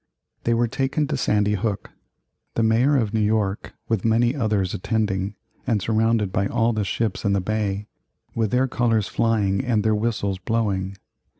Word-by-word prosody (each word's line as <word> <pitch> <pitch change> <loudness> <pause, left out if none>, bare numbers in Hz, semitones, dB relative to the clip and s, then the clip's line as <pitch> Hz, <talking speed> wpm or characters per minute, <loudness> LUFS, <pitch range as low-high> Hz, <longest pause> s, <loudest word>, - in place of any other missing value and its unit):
They 115 - +3
were 120 +1 +2
taken 135 +5 0
to 150 - 0
Sandy 105 -5 +1
Hook, 105 0 -2 0.6
the 115 - +2
Mayor 120 +6 +3
of 110 -4 0
New 110 - +1
York, 105 -2 0
with 115 -5 0
many 120 +3 +2
others, 105 -8 0
attending, 100 -1 -1 0.3
and 115 -4 +2
surrounded 110 -1 +1
by 100 +1 +1
all 115 +2 +1
the 110 -1 -1
ships 110 +1 -2
in 100 -2 +2
the 100 - +2
bay, 105 0 -2 0.5
with 110 -2 0
their 125 +4 +2
colors 115 -4 +1
flying 105 -2 +1
and 115 -5 +1
their 110 0 +2
whistles 105 -3 -1
blowing. 100 -3 -1
110 Hz, 170 wpm, -23 LUFS, 100-115 Hz, 0.6 s, They